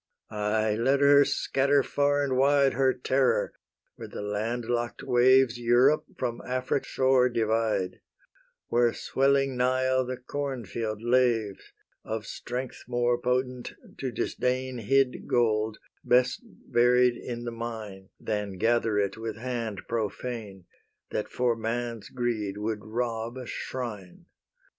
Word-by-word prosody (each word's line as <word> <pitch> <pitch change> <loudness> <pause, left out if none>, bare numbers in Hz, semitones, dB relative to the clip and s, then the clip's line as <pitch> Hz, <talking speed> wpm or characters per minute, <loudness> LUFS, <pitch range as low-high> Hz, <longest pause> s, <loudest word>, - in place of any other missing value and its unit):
Aye, 105 +1 0
let 135 +4 +3
her 140 0 +7
scatter 140 0 +2
far 145 +1 +1
and 135 -2 0
wide 140 +1 +4
Her 130 +1 +3
terror, 130 +1 +1 0.4
where - - -8
the - - -7
land 110 +4 -2
lock'd 120 0 -2
waves 125 0 +4
Europe 120 +5 +4
from 120 -2 -3
Afric's 130 +2 -1
shore 130 -1 +3
divide, 110 -5 0 0.7
Where 120 -1 +3
swelling 135 0 +1
Nile 130 +1 +2
the 130 0 -4
corn 130 -1 -4
field 110 +1 -4
laves 120 -5 +1 0.3
Of 110 -1 -4
strength 125 +4 -6
more 120 0 +1
potent 125 0 -1 0.3
to 130 -2 -2
disdain 125 +2 -2
Hid 135 +3 +1
gold, 110 -2 +1 0.3
best 125 +1 +3
buried 125 +1 +2
in 120 0 -6
the 120 - -4
mine, 110 -4 -7
Than 105 -3 -3
gather 115 0 +2
it 100 0 0
with 115 0 -5
hand 115 -4 -4
profane, 110 -3 -4 0.5
That 105 - -2
for 125 -2 +1
man's 115 -1 -3
greed 115 -5 -2
would 105 0 -3
rob 115 +1 -3
a 130 - -6
shrine. 110 -9 -6
120 Hz, 130 wpm, -27 LUFS, 110-130 Hz, 0.7 s, her